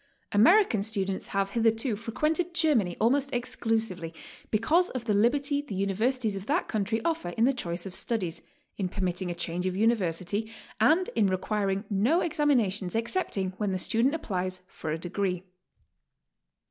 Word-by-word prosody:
American 230 Hz, -, +5 dB
students 195 Hz, -2 st, 0 dB
have 195 Hz, 0 st, -1 dB
hitherto 225 Hz, +1 st, +1 dB
frequented 305 Hz, -, -1 dB
Germany 235 Hz, -, +2 dB
almost 275 Hz, +5 st, +2 dB
exclusively 220 Hz, -8 st, -2 dB, 0.3 s
because 315 Hz, +12 st, +2 dB
of 250 Hz, -3 st, -5 dB
the 215 Hz, -, +1 dB
liberty 280 Hz, +7 st, +2 dB
the 285 Hz, -9 st, -7 dB
universities 215 Hz, +4 st, 0 dB
of 195 Hz, +1 st, -6 dB
that 285 Hz, -, +1 dB
i -, -, +5 dB
62 -, -, -11 dB
GOING 215 Hz, -, +1 dB
ABROAD? 195 Hz, -, -1 dB
country 225 Hz, +1 st, 0 dB
offer 325 Hz, -, -1 dB
in 225 Hz, -, +4 dB
the 270 Hz, -, +3 dB
choice 175 Hz, -7 st, -4 dB
of 190 Hz, -, -6 dB
studies, 185 Hz, -6 st, -2 dB, 0.4 s
in 185 Hz, -2 st, -1 dB
permitting 185 Hz, -1 st, -2 dB
a 175 Hz, -, -3 dB
change 175 Hz, +2 st, -2 dB
of 185 Hz, -, -2 dB
university, 205 Hz, -1 st, 0 dB, 0.3 s
and 315 Hz, +12 st, +4 dB
in 215 Hz, -3 st, +3 dB
requiring 195 Hz, +1 st, -1 dB
no 225 Hz, -, +2 dB
examinations 235 Hz, -, +1 dB
excepting 225 Hz, -, -1 dB
when 205 Hz, -3 st, -1 dB
the -, -, 0 dB
student 230 Hz, -, +1 dB
applies 185 Hz, -, -3 dB
for 160 Hz, -, -6 dB
a 155 Hz, -, -1 dB
degree. 180 Hz, +1 st, -2 dB
215 Hz, 165 wpm, -28 LUFS, 190-250 Hz, 0.4 s, American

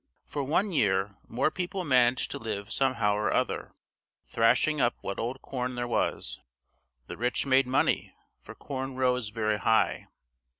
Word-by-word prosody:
For 145 Hz, -, -3 dB
one 180 Hz, +9 st, +1 dB
year 100 Hz, -, +1 dB
more 125 Hz, +7 st, +1 dB
people 185 Hz, +1 st, -3 dB
managed 125 Hz, -3 st, +3 dB
to -, -, -4 dB
live 105 Hz, -1 st, -5 dB
somehow 120 Hz, -6 st, +1 dB
or 105 Hz, +1 st, 0 dB
other, -, -, -1 dB, 0.5 s
thrashing 125 Hz, +6 st, +2 dB
up 120 Hz, -1 st, +2 dB
what 100 Hz, -, -4 dB
old 125 Hz, +4 st, -4 dB
corn 125 Hz, -1 st, -3 dB
there 120 Hz, 0 st, -2 dB
was; 120 Hz, -, -1 dB, 0.7 s
the -, -, -8 dB
rich 125 Hz, +4 st, 0 dB
made 135 Hz, -1 st, +4 dB
money, 130 Hz, -, +1 dB, 0.3 s
for -, -, -11 dB
corn 135 Hz, -1 st, -5 dB
rose 125 Hz, -3 st, +1 dB
very 110 Hz, -1 st, -1 dB
high. 110 Hz, +1 st, +2 dB
125 Hz, 155 wpm, -28 LUFS, 110-135 Hz, 0.7 s, made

